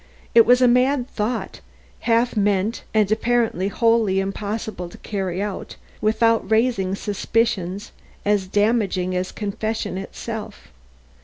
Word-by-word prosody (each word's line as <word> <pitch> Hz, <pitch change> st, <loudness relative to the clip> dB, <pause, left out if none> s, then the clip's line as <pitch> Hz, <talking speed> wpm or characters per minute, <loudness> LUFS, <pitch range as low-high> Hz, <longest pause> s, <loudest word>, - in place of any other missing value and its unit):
It 230 Hz, -2 st, +7 dB
was 250 Hz, +1 st, +6 dB
a -, -, +7 dB
mad 250 Hz, +1 st, +3 dB
thought, 225 Hz, 0 st, -3 dB, 0.5 s
half 230 Hz, +2 st, +3 dB
meant 205 Hz, +1 st, +1 dB
and 215 Hz, -2 st, +2 dB
apparently 225 Hz, -4 st, +1 dB
wholly 225 Hz, -2 st, +2 dB
impossible 195 Hz, -1 st, -4 dB
to -, -, -13 dB
carry 190 Hz, -2 st, -3 dB
out 205 Hz, -2 st, -5 dB, 0.3 s
without 225 Hz, +1 st, +2 dB
raising 220 Hz, -4 st, +2 dB
suspicions 200 Hz, -2 st, -1 dB, 0.3 s
as 205 Hz, -2 st, +1 dB
damaging 205 Hz, -3 st, +1 dB
as 180 Hz, 0 st, -2 dB
confession 210 Hz, -2 st, -3 dB
itself. 215 Hz, -, -7 dB
210 Hz, 120 wpm, -22 LUFS, 195-230 Hz, 0.5 s, It